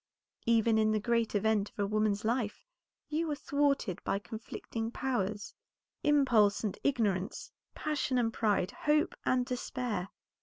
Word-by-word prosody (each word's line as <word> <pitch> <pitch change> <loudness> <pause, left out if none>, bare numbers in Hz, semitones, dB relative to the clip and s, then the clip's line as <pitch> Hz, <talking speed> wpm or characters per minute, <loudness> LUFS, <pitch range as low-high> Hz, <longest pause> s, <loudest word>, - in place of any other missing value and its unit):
Even 225 -1 +4
in 215 0 +3
the 215 - +2
great 230 0 0
event 210 0 +2
of - - -32
a 205 - +1
woman's 215 0 0
life, 230 - -1 0.4
you 315 +2 -1
were 300 - -1
thwarted 280 - 0
by 195 - 0
conflicting 225 +1 -5
powers; 215 -6 -2 0.5
impulse 245 -9 +4
and 205 -3 -1
ignorance, 210 -8 0 0.2
passion 290 -4 -1
and 225 -2 +1
pride, 205 -5 +1
hope 300 0 +1
and 255 -1 +3
despair. 245 -6 -3
225 Hz, 140 wpm, -32 LUFS, 205-260 Hz, 0.5 s, Even